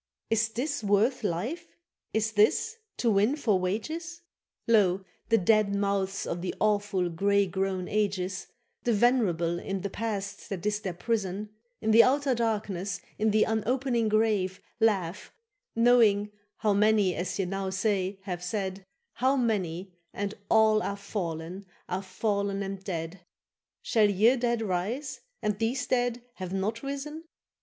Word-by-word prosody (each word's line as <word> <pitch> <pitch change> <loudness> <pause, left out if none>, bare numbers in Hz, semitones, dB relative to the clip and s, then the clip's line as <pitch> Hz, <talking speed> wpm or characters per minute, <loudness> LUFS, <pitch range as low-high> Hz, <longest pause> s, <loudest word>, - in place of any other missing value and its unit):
—Is 225 0 +2
this 270 +5 -2
worth 210 +5 +2
life, 235 - -2 0.4
is 220 0 0
this, 220 - +3 0.2
to 235 - +2
win 210 +7 +3
for 220 -10 +1
wages? 315 - -3 0.5
Lo, 195 -4 +3 0.2
the 225 - +5
dead 210 +1 +3
mouths 200 -1 0
of 170 - -3
the 180 - -3
awful 205 -3 +1
grey 200 +4 +2
grown 190 0 -2
ages, 195 -3 -1 0.3
The 240 - +1
venerable, 195 -8 +2
in 195 +1 -3
the 200 0 -4
past 205 -3 -4
that 195 -3 -5
is 210 0 +1
their 190 -5 -4
prison, 210 0 -2 0.3
In 220 - +1
the 225 +1 +9
outer 275 +1 +3
darkness, 210 -5 -1 0.2
in 220 +1 +3
the 215 0 +4
unopening 235 +1 0
grave, 210 -3 +1 0.2
Laugh, 200 -5 +1 0.4
knowing 225 -3 +4 0.3
how 210 -2 +2
many 210 -2 +3
as 175 +2 -3
ye 195 - 0
now 195 +1 -2
say 190 0 0
have 180 -3 -4
said, 195 0 -3 0.3
How 260 +2 +2
many, 190 -7 -1 0.2
and 200 0 -2 0.2
all 220 -1 +5
are 200 - -3
fallen, 185 -2 -5 0.2
are 185 +1 -2
fallen 200 +1 -1
and 195 0 -5
dead: 170 -1 -4 0.6
Shall 215 -3 +3
ye 215 +6 +4
dead 235 -2 0
rise, 225 +9 -2 0.2
and 210 -1 0
these 235 +4 0
dead 245 -1 0
have 185 -1 -5
not 205 +4 -1
risen? 280 +4 -5
205 Hz, 145 wpm, -28 LUFS, 190-230 Hz, 0.6 s, the